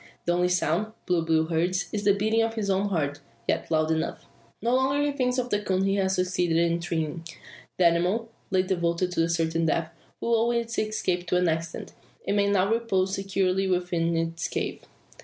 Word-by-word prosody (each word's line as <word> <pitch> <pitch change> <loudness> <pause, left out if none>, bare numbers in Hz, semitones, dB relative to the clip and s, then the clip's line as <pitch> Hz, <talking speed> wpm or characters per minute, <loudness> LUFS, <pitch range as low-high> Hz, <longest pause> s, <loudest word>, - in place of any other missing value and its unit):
The 175 - +2
only 180 +1 +2
sound, 180 +4 0
Blue 175 -2 +1
Bill 160 -1 +2
hears, 175 +3 0
is 210 -1 -2
the 200 -1 +5
beating 220 +3 +2
of 225 0 0
his 205 -3 -1
own 195 +1 +1
heart, 145 -6 -1 0.3
yet - - 0
loud 155 0 +2
enough. 160 0 -2 0.3
No 235 +3 0
longer 270 +3 +2
thinks 255 -3 0
he 255 - +2
of 245 - -11
the 205 - +1
coon 190 -1 0
he 195 0 +2
has 190 -1 +1
succeeded 180 -2 +1
in 170 0 +2
treeing. 165 -1 -3 0.5
The 180 - +3
animal, 180 +7 +2 0.2
late 185 -2 +1
devoted 170 0 0
to 165 -1 +1
certain 165 0 +1
death, 160 +1 0 0.3
will 235 - 0
owe 230 +1 +3
its 235 -1 -1
escape 185 -5 -1
to 180 - +2
an 180 0 +2
accident, 165 0 -3 0.3
and 200 - 0
may 200 -1 +3
now 195 0 +2
repose 195 -5 0
securely 195 -1 0
within 175 -2 0
its 165 0 -2
cave. - - -3
185 Hz, 195 wpm, -26 LUFS, 170-205 Hz, 0.5 s, the